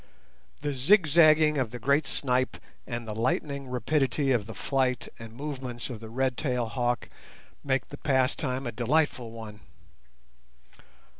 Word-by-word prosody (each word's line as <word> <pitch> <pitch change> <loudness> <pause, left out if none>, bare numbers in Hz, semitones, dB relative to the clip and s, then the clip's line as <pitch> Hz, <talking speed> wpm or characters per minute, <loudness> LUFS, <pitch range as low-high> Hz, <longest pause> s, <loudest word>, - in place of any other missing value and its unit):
The 145 -1 -1
zigzagging 155 0 +5
of 130 -4 0
the 125 - -7
great 140 +5 +2
snipe 130 -1 0 0.3
and 120 -2 -4
the 110 - -3
lightning 135 +5 -1
rapidity 135 +1 +1
of 115 -5 +1
the 115 - -8
flight 130 -3 0
and 115 -1 -9
movements 130 -1 -5
of 115 - -6
the 110 0 -9
red 130 +1 0
tailed 125 -5 -1
hawk 120 -2 -1 0.6
make 135 -1 0
the 145 - -9
pastime 130 -1 0
a 120 - -2
delightful 125 -1 +1
one. 110 -2 -9
130 Hz, 140 wpm, -28 LUFS, 120-145 Hz, 0.6 s, zigzagging